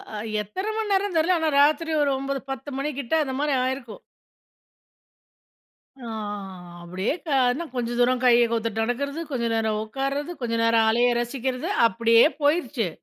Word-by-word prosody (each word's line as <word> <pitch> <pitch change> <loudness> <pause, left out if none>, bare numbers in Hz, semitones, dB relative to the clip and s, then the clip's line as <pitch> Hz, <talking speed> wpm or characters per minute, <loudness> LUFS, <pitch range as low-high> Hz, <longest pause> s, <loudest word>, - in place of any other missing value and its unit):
அ - - -4 0.2
எத்தன 380 - -4
மண்நேரம்ன்னு 400 -4 0
தெரில, 345 +3 +3
ஆனா 320 -1 +1
ராத்திரி 310 +3 +2
ஒரு 280 - +1
9:00, 275 0 -3
10:00 270 +2 -6
மணி 285 +2 -1
கிட்ட 270 +3 -4
அந்த 265 -2 -4
மாரி 295 -1 +1
ஆயிருக்கும். 255 -4 -4 2.0
ஆ - - -7 0.8
அப்டியே 185 - -2
கானா 265 +2 +1
கொஞ்சம் 240 0 -2
தூரம் 250 +1 +2
கைய 240 -1 +5
கோத்துட்டு 225 -1 -1
நடக்கறது, 280 +6 -2
கொஞ்சம் 235 -4 -1
நேரம் 220 -1 0
உட்கார்றது, 275 +7 -3
கொஞ்சம் 230 -1 -1
நேரம் 230 -1 +3
அலைய 240 +2 +3
ரசிக்கறது, 255 +5 -3 0.2
அப்பிடியே 230 +1 +4 0.2
போயிருச்சு! 290 - +1
255 Hz, 145 wpm, -24 LUFS, 230-290 Hz, 2.0 s, கைய